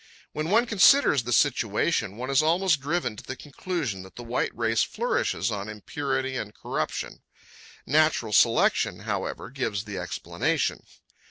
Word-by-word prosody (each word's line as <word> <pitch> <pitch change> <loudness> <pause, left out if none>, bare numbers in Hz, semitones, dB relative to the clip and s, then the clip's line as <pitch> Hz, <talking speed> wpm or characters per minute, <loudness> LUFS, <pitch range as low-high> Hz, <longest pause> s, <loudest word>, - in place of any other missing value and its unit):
When 155 +2 -3
one 225 +5 +4
considers 225 - +5
the 120 - -3
situation, 115 - +1
one 130 +3 -4
is 135 - +4
almost 165 -1 +2
driven 150 -5 -1
to - - -9
the 130 - -6
conclusion 145 - -4
that 95 0 -13
the 120 - -8
white 120 +1 -1
race 115 -1 +1
flourishes 105 - -1
on 100 0 -4
impurity 130 +5 -3
and 105 -2 -6
corruption. - - -4 0.6
Natural 150 -6 +2
selection, - - +3
however, - - -4
gives 110 -7 -2
the 105 -3 -6
explanation. - - -2
130 Hz, 145 wpm, -26 LUFS, 110-155 Hz, 0.6 s, considers